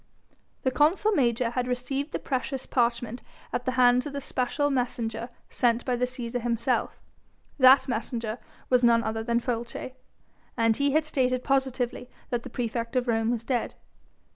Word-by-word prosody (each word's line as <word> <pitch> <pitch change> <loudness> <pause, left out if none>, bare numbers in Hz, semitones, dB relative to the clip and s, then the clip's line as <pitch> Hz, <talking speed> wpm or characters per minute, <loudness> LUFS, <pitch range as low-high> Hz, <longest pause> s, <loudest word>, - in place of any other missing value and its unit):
The 260 - +2
consul 320 +11 +3
major 240 - +1
had 250 0 -1
received 270 +4 -2
the - - -1
precious 265 0 -3
parchment 240 -1 0 0.3
at 245 - -2
the 255 - 0
hands 250 +1 +4
of 285 - -7
the 280 - -2
special 280 +2 -1
messenger 235 -3 -2 0.2
sent 240 -1 +1
by 250 - +1
the 250 +1 +1
Cæsar 245 -1 -4
himself: 235 +1 -1 0.6
that 260 +1 +7
messenger 230 -1 -3 0.3
was 250 -1 +3
none 230 -1 +5
other 220 0 -2
than 235 +1 +1
Folces, 240 +1 -4 0.7
and 230 -1 +3
he 280 -1 +1
had 310 0 +3
stated 255 -4 0
positively 260 -2 -1 0.2
that 240 -1 0
the - - -9
praefect 230 0 -3
of 250 -1 +1
Rome 225 -1 +1
was 235 -1 -1
dead. 245 -1 -2
245 Hz, 165 wpm, -27 LUFS, 235-260 Hz, 0.7 s, that